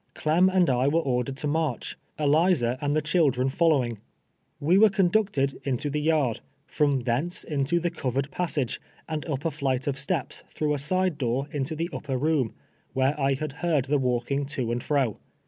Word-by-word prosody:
Clem 170 +5 +3
and 185 -2 +3
I 130 0 +2
were 160 +4 +3
ordered 130 -1 -1
to 150 - -3
march, 150 -4 -1 0.2
Eliza 150 -4 +3
and 145 0 0
the 155 - +1
children 145 -5 +2
fol 165 +5 +2
lowing. 120 -8 +1 0.6
IVe 175 +7 +4
were 220 - +8
conducted 190 -7 +1
into 140 +2 -2
the 150 +1 -1
yard, 150 -7 +1 0.3
from 145 -4 +1
thence 130 +9 -1
into 150 +2 0
the 170 0 -1
covered 135 +2 -2
passage, 145 -6 -2 0.3
and 155 -2 -3
up 145 -1 -3
a 165 - +1
flight 135 -3 -1
of 140 -2 -1
steps 145 +1 -2
through 150 -1 -1
a 145 - -1
side 185 +2 0
door 130 +2 -1
into 145 +2 -2
the 165 +3 -3
upper 135 -3 -3
room, 145 -4 0 0.4
where 135 +2 +2
I 135 0 +2
had 150 +2 -4
heard 160 -7 +1
the 145 +1 +1
walking 130 +2 -1
to 130 -5 -2
and 120 +1 -1
fro. 135 -7 0
145 Hz, 185 wpm, -26 LUFS, 130-160 Hz, 0.6 s, were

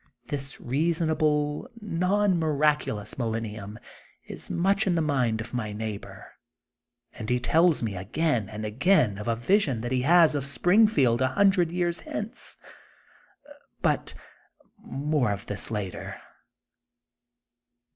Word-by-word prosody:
This 140 -1 -3
reasonable, 155 - 0
non 195 -1 +1
miraculous 150 -9 0
millenium 110 -3 -4 0.5
is - - -6
much 195 +4 +1
in 180 - +2
the - - +2
mind 125 -7 0
of 120 +3 -9
my 110 -4 -3
neigh 105 -1 -4
bor, - - -14 0.7
and 110 -2 -7
he 125 0 +2
tells 165 +2 +3
me 105 -3 -2
again 115 - -1
and 110 0 -6
again 115 - +2
of 105 - -6
a 115 - +1
vision 140 - +1
that 120 +1 -4
he 130 -1 +1
has 165 +3 +5
of 145 -2 -1
Springfield 160 - +3
a 130 - +3
hundred 185 +3 +3
years 175 0 -1
hence. 210 +4 -7 1.3
But - - 0 0.6
more 145 -1 -1
t>f 100 -1 -3
this 105 - -3
later. 105 -4 -5
140 Hz, 125 wpm, -26 LUFS, 115-170 Hz, 1.3 s, has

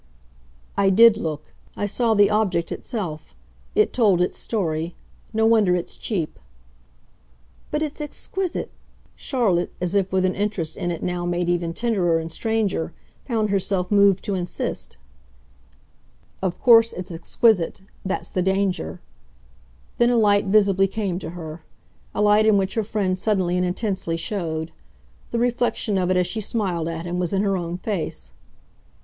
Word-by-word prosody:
"I 195 -1 +3
did 225 +3 +7
look. 155 -8 -5 0.2
I - - -1
saw 225 +2 +1
the 205 0 +5
object 190 -6 +1
itself. 160 - -5 0.4
It - - +3
told 210 -7 +3
its 180 - +1
story. 165 -6 -2 0.4
No 220 0 +2
wonder 215 -5 +4
it's 175 - -4
cheap." 175 -9 -3 1.3
"But 300 +1 -1
it's 300 0 -5
exquisite," 360 +5 -4 0.4
Charlotte, 205 -10 0
as 180 0 -2
if 195 -2 +1
with 185 0 +2
an 185 - +1
interest 195 -6 -2
in 175 - -3
it 170 -2 -4
now 180 -1 -2
made 175 0 0
even 175 -1 0
tenderer 180 -4 +1
and 165 0 -4
stranger, 215 -5 -1 0.3
found 220 -5 0
herself 195 -1 0
moved 200 -2 +4
to 205 - -2
insist. 180 - -4 1.4
"Of 185 -2 -2
course 230 -2 +6
it's 180 0 -7
exquisite. 180 +3 +1 0.2
That's 190 0 -3
the 185 - 0
danger." 190 - -1 1.0
Then 240 0 +5
a 245 - +3
light 205 -2 +4
visibly 195 -1 +4
came 195 -3 -2
to - - -6
her 160 -1 -7 0.5
a 210 - +1
light 210 +1 +5
in 215 -2 +5
which 190 -1 0
her 225 - 0
friend 195 -3 -1
suddenly 185 -4 +1
and 180 - +1
intensely 185 -3 -2
showed. 165 -3 -3 0.6
The 235 - -2
reflection 240 -4 0
of 180 -1 0
it, 185 - +2
as 180 - +3
she 215 +5 -2
smiled 190 -7 -1
at 165 0 -4
him, 175 +1 -3
was 180 -2 -1
in 195 0 +1
her 195 -1 +1
own 175 -1 -3
face. 190 -3 -4
195 Hz, 155 wpm, -23 LUFS, 175-215 Hz, 1.4 s, did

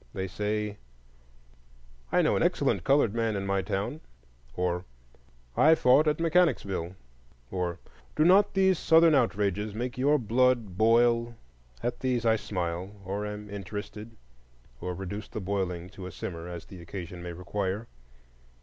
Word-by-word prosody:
they 95 0 -2
say, 105 +2 -3 1.3
I - - +4
know - - +3
an - - +1
excellent - - +1
colored 135 -6 +3
man 115 -2 0
in 100 0 -2
my 100 0 +1
town; 100 - -3 0.5
or, 90 -1 -1 0.7
I 160 +2 +6
fought 145 +2 +4
at 150 - +1
Mechanicsville; 155 - +1 0.6
or, 90 -2 -2 0.4
Do 155 - +3
not 195 +4 +5
these 190 -2 +3
Southern 165 0 +5
outrages 105 -5 +1
make 120 +2 -4
your 145 +3 +4
blood 120 -4 +1
boil? 115 +2 +3 0.5
At 120 0 -2
these 125 -3 0
I 110 -1 +5
smile, 90 -1 -4
or 100 +2 -3
am 105 0 -6
interested, 105 +2 -7 0.6
or 90 0 -4
reduce 100 +3 -6
the - - -6
boiling 95 -3 -2
to 95 -2 -8
a - - -8
simmer, 85 0 -6
as 85 -1 -7
the 95 -4 -11
occasion 85 0 -7
may 85 0 -6
require. 95 +4 -3
105 Hz, 145 wpm, -28 LUFS, 95-120 Hz, 1.3 s, I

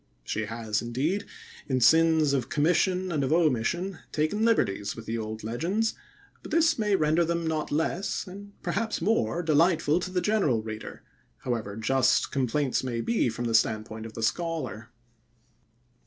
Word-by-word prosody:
She 110 - -2
has, 110 -1 -2
indeed, 140 - -2 0.4
in 130 -2 +1
sins 160 +2 +5
of 130 -2 -1
commission 180 +4 +1
and 150 -4 0
of 135 - -1
omission, 165 +4 +1
taken 155 +8 0
liberties 105 - +1
with 115 - -9
the 115 +1 -3
old 110 0 -5
legends, 175 - -1 0.5
but - - -10
this 325 -4 +3
may 210 -2 +2
render 155 0 +2
them 170 0 -1
not 160 -1 -1
less, 165 +5 -1
and 200 +2 -10
perhaps 220 +1 -1
more, 175 - +1
delightful 160 0 +3
to 185 - -4
the 185 0 0
general 175 - +1
reader, 110 0 -7 0.4
however 115 -5 -3
just 130 +4 +2
complaints 135 +1 0
may 120 -3 -2
be 230 - +1
from 115 +2 -4
the 115 - -1
standpoint 110 0 0
of 110 - -12
the 115 - -5
scholar. 160 -6 -2
150 Hz, 155 wpm, -27 LUFS, 115-180 Hz, 0.5 s, sins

